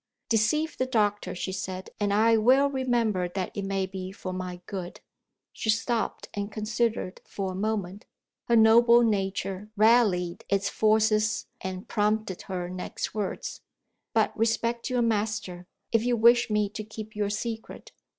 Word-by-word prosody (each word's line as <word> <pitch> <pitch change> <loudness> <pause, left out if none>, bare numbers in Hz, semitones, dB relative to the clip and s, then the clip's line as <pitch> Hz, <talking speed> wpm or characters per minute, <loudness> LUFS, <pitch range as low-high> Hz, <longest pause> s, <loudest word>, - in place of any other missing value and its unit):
"Deceive 300 +9 +1
the 255 - +1
doctor," 210 -6 0
she 190 - -3
said, 190 -1 -5
"and 205 -1 +1
I 225 +3 +4
well 260 +6 +4
remember 235 -9 0
that 185 0 -4
it 200 - -3
may 195 -1 -1
be 190 0 -6
for 185 -1 -6
my 180 -1 -5
good." 185 -3 -6 0.5
She 220 - -4
stopped, 225 +1 0
and 205 +1 -4
considered 215 -2 -2
for 195 -2 -4
a - - -6
moment. 200 -1 -3 0.4
Her 235 - +3
noble 235 +2 +6
nature 195 -1 -1
rallied 205 -6 +3
its 200 0 +1
forces, 215 0 +2 0.2
and 185 0 -5
prompted 210 -2 0
her 180 -2 -3
next 180 0 -5
words: 210 -2 -4 0.5
"But - - +1
respect 230 +2 0
your 250 -1 +1
master, 210 -5 -2 0.2
if 230 -1 +3
you 245 0 +1
wish 235 +2 +5
me 210 -1 +2
to 215 +1 -6
keep 215 0 -9
your 205 -1 0
secret. 225 +2 -5
215 Hz, 150 wpm, -27 LUFS, 190-230 Hz, 0.5 s, noble